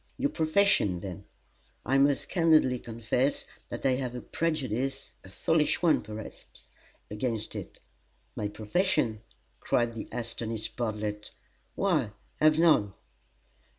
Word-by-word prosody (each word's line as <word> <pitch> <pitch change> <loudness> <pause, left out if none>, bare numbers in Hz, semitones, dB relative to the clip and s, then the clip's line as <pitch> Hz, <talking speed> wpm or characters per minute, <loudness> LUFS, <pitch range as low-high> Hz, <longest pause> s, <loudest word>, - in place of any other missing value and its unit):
"Your 280 +2 0
profession, 160 - +3
then. 90 -3 -7 0.6
I 135 +1 +3
must 140 0 +3
candidly 155 -8 +4
confess 115 +4 -1 0.2
that - - -6
I 135 - +5
have 125 -2 -3
a 125 - -5
prejudice 135 -6 -2
a 95 - -13
foolish 160 - +1
one, 165 -3 +4
perhaps, 110 0 -10 0.4
against 110 0 -2
it." - - -7 0.6
"My 105 - -2
profession!" 110 - 0 0.4
cried 120 -1 +1
the 115 - -6
astonished 115 -2 -4
Bartlett; 105 -2 -3 0.5
"why, - - +1 0.3
I - - +2
have 155 0 +6
none!" 150 - +4
120 Hz, 120 wpm, -29 LUFS, 110-155 Hz, 0.6 s, have